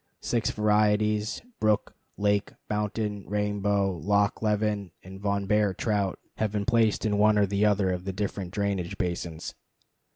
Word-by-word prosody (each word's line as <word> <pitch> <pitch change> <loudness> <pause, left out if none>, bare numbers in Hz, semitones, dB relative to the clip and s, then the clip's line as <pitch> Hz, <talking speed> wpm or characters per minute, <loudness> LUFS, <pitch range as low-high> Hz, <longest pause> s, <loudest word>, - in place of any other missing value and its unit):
Six 115 -3 0
varieties 105 +1 +2 0.2
brook, 110 -1 +1 0.2
lake, 100 0 +1 0.2
mountain, 105 -1 -2
rainbow, 100 -1 0
Loch 100 +5 +1
Leven, 105 -2 0
and 95 +1 -10
Von 100 -1 0
Behr 105 -2 +2
trout 100 -4 0 0.2
have 110 -2 0
been 105 -1 -2
placed 115 -4 +2
in 105 -1 +1
one 105 0 +5
or 105 - +5
the 100 +2 +2
other 100 -2 +2
of 90 0 -4
the 95 - -2
different 95 -1 -3
drainage 100 -1 -2
basins. 85 -3 -3
105 Hz, 150 wpm, -27 LUFS, 100-105 Hz, 0.2 s, one